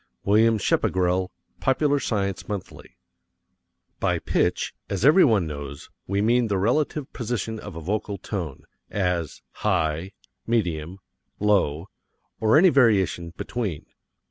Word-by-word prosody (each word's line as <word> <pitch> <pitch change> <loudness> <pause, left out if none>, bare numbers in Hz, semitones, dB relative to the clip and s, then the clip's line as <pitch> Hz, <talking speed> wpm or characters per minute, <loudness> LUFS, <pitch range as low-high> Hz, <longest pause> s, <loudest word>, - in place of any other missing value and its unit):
WILLIAM 110 +2 +4
SCHEPPEGRELL, 90 -2 +1 0.3
Popular 140 +2 +2
Science 100 -6 -2
Monthly. 100 -3 -7 1.0
By - - +1
pitch, - - 0 0.2
as 100 +3 -1
everyone 135 - +5
knows, 70 -2 -7 0.2
we 100 +1 0
mean 120 +1 +3
the 100 -2 0
relative 140 +7 0
position 115 -2 -3
of 105 -5 -9
a 85 - -6
vocal 100 +3 -2
tone 90 -8 -5 0.3
as, 90 -5 -2 0.2
high, 80 +4 0 0.3
medium, 90 -7 -1 0.4
low, 95 -6 +1 0.5
or 110 +5 +4
any 185 +4 +7
variation 100 - +2
between. 105 -10 -4
100 Hz, 115 wpm, -24 LUFS, 90-115 Hz, 1.0 s, any